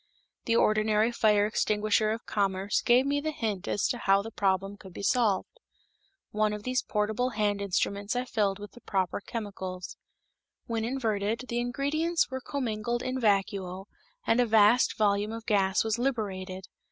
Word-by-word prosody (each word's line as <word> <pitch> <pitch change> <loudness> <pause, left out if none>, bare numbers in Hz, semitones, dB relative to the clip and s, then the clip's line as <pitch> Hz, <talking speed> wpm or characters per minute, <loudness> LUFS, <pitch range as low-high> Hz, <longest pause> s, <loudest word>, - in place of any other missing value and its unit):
The 230 - +2
ordinary 215 0 +3
fire 210 -3 +3
extinguisher 215 0 +1
of 225 +1 -3
commerce 195 -1 0
gave 245 +2 +4
me 285 +1 0
the 310 - -2
hint 220 -10 -3
as 205 - +1
to 245 - -2
how 195 -1 +3
the 225 - -7
problem 195 -1 0
could 190 -3 -13
be - - -7
solved. 235 - +1 0.7
One 215 0 +1
of 210 0 -6
these 255 +1 0
portable 215 +4 -1
hand 205 -1 +1
instruments 200 +2 -1
I 250 +1 -1
filled 205 -5 0
with 205 0 -9
the 240 - -16
proper 190 -1 -1
chemicals. 190 -5 -6 0.7
When 230 -1 -2
inverted, 225 -2 -1
the 235 - -1
ingredients 285 +7 0
were 260 0 -4
commingled 240 -4 -2
in 255 0 -2
vacuo 195 -3 0 0.4
and 225 - +3
a 245 - +3
vast 220 +2 +4
volume 205 0 +1
of 225 0 -7
gas 195 -2 +2
was 220 +1 -1
liberated. 190 -7 -3
215 Hz, 165 wpm, -28 LUFS, 200-240 Hz, 0.7 s, gave